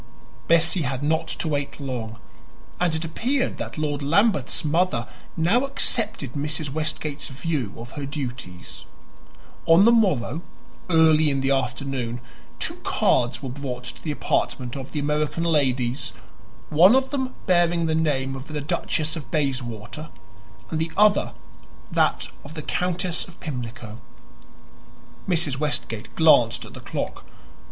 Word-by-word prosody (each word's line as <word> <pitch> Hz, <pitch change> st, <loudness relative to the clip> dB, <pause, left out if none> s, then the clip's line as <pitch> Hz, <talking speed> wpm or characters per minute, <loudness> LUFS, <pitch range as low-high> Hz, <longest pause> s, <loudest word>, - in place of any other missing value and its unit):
Bessie 170 Hz, +1 st, +4 dB
had 130 Hz, -1 st, -2 dB
not 160 Hz, +2 st, +1 dB
to 160 Hz, -, -3 dB
wait 145 Hz, -2 st, -2 dB
long, 120 Hz, -5 st, -4 dB, 0.6 s
and 175 Hz, -3 st, +2 dB
it 160 Hz, +1 st, -2 dB
appeared 255 Hz, -, -1 dB
that -, -, -5 dB
Lord 150 Hz, -2 st, -1 dB
Lambeth's 165 Hz, -, +2 dB
mother 175 Hz, +5 st, +1 dB, 0.3 s
now 190 Hz, +11 st, +3 dB
accepted 220 Hz, -, 0 dB
Mrs. 150 Hz, 0 st, -2 dB
Westgate's 155 Hz, -1 st, -2 dB
view 140 Hz, -, -2 dB
of 120 Hz, +1 st, -9 dB
her 140 Hz, -2 st, -5 dB
duties. 125 Hz, -11 st, -6 dB, 0.8 s
On 170 Hz, +4 st, +7 dB
the 235 Hz, -, +7 dB
morrow, 170 Hz, -, +2 dB, 0.5 s
early 160 Hz, -2 st, +5 dB
in 135 Hz, -1 st, 0 dB
the 135 Hz, +1 st, +1 dB
afternoon, 130 Hz, -2 st, -1 dB, 0.4 s
two -, -, -1 dB
cards 125 Hz, +2 st, +1 dB
were 135 Hz, -, -3 dB
brought 130 Hz, -2 st, -5 dB
to 120 Hz, -, -8 dB
the 160 Hz, -, -4 dB
apartment 130 Hz, -3 st, -1 dB
of 135 Hz, -1 st, -6 dB
the -, -, -5 dB
American 150 Hz, +2 st, 0 dB
ladies 130 Hz, -6 st, +1 dB, 0.6 s
one 180 Hz, +9 st, +7 dB
of 265 Hz, 0 st, +2 dB
them 265 Hz, -2 st, -2 dB
bearing 175 Hz, -2 st, +3 dB
the 160 Hz, -, +1 dB
name 140 Hz, -4 st, +1 dB
of 135 Hz, 0 st, -7 dB
the 155 Hz, -1 st, -3 dB
Duchess 155 Hz, +2 st, -1 dB
of 155 Hz, -4 st, -7 dB
Bayswater 130 Hz, -2 st, -2 dB, 0.6 s
and 160 Hz, -, -1 dB
the 160 Hz, 0 st, -1 dB
other 210 Hz, 0 st, +4 dB, 0.6 s
that -, -, +1 dB
of 145 Hz, +3 st, -10 dB
the 155 Hz, -, -5 dB
Countess 180 Hz, +1 st, -1 dB
of 180 Hz, -, -15 dB
Pimlico. 120 Hz, -5 st, -6 dB, 1.3 s
Mrs. 160 Hz, -7 st, +2 dB
Westgate 120 Hz, -7 st, -3 dB
glanced 120 Hz, -8 st, +5 dB
at -, -, -12 dB
the -, -, -9 dB
clock. -, -, -4 dB
150 Hz, 140 wpm, -24 LUFS, 130-165 Hz, 1.3 s, On